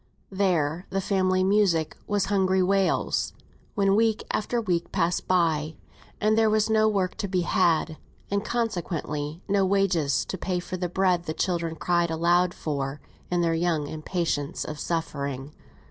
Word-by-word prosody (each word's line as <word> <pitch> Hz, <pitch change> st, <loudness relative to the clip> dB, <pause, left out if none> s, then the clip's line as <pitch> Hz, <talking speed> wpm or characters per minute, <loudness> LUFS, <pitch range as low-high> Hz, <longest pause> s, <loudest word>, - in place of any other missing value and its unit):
There, 180 Hz, -4 st, 0 dB
the 195 Hz, -, -1 dB
family 185 Hz, -1 st, +1 dB
music 190 Hz, -5 st, +2 dB
was 205 Hz, -2 st, +1 dB
hungry 190 Hz, -2 st, +2 dB
wails, 195 Hz, +1 st, +1 dB, 0.4 s
when 195 Hz, -2 st, +3 dB
week 220 Hz, 0 st, +2 dB
after 235 Hz, +3 st, -1 dB
week 175 Hz, -6 st, -1 dB
passed 170 Hz, +1 st, 0 dB
by, 160 Hz, -4 st, +1 dB, 0.4 s
and 215 Hz, +1 st, +3 dB
there 220 Hz, -1 st, +4 dB
was 215 Hz, 0 st, +2 dB
no 220 Hz, 0 st, +4 dB
work 195 Hz, -4 st, 0 dB
to 200 Hz, -, -2 dB
be 185 Hz, -1 st, 0 dB
had, 165 Hz, -2 st, +1 dB, 0.3 s
and 200 Hz, 0 st, 0 dB
consequently 175 Hz, -9 st, -3 dB
no 200 Hz, -1 st, +2 dB
wages 185 Hz, -8 st, +1 dB
to 190 Hz, -, -5 dB
pay 180 Hz, 0 st, -1 dB
for 180 Hz, -, -5 dB
the 180 Hz, -1 st, -3 dB
bread 180 Hz, -1 st, +1 dB
the 155 Hz, -, -4 dB
children 170 Hz, -3 st, -1 dB
cried 175 Hz, 0 st, +1 dB
aloud 175 Hz, +2 st, +2 dB
for 140 Hz, -2 st, -3 dB, 0.3 s
in 175 Hz, -1 st, +1 dB
their 165 Hz, -1 st, +2 dB
young 165 Hz, -2 st, 0 dB
impatience 155 Hz, -1 st, -2 dB
of 150 Hz, -1 st, -6 dB
suffering. 140 Hz, -4 st, -3 dB
180 Hz, 155 wpm, -26 LUFS, 160-195 Hz, 0.4 s, there